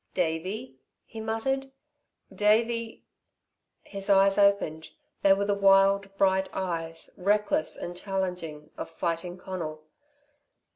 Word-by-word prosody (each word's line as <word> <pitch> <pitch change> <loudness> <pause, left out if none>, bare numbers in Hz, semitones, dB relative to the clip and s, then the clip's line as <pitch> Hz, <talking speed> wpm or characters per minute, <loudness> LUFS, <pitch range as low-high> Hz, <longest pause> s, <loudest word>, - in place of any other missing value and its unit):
"Davey?" 185 +8 -2 0.3
he 225 - -8
muttered. 270 +5 -2 0.6
"Davey 225 +2 +1 0.4
" - - -53
His 195 0 -5
eyes 195 0 +5
opened; 200 -6 +2 0.3
they 195 - +5
were 200 +1 0
the 205 - +1
wild, 195 0 +4
bright 190 0 +2
eyes, 165 -3 -3
reckless 205 -3 +1
and 175 - -6
challenging, 180 -6 -4
of - - -5
Fighting 170 +1 -3
Conal. 165 -5 -6
195 Hz, 110 wpm, -28 LUFS, 175-205 Hz, 0.6 s, eyes